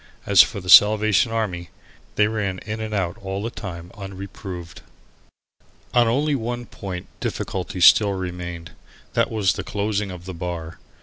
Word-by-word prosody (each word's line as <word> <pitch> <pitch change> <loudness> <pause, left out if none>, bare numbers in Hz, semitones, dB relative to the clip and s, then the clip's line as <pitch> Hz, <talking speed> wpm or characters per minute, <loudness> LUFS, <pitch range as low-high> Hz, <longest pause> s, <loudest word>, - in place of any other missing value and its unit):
As - - +7
for - - 0
the 90 - -11
Salvation 110 +3 +6
Army, 95 -6 -2 0.5
they 105 - +4
ran 105 -4 -2
in 110 +1 -4
and 110 0 -4
out 95 -5 -2
all 95 +1 -4
the 115 - -3
time 85 -4 -8
unreproved. 95 -3 -8 1.1
On 120 -1 +4
only 145 +6 +1
one 120 -1 -3
point 95 -5 -7
difficulty 95 0 -4
still 100 +3 +6
remained. 90 -2 -6 0.4
That 115 0 +2
was 105 -4 +1
the - - -5
closing 105 0 -2
of 90 -2 -9
the 95 - -6
bar. 85 -1 -6
100 Hz, 150 wpm, -22 LUFS, 90-110 Hz, 1.1 s, As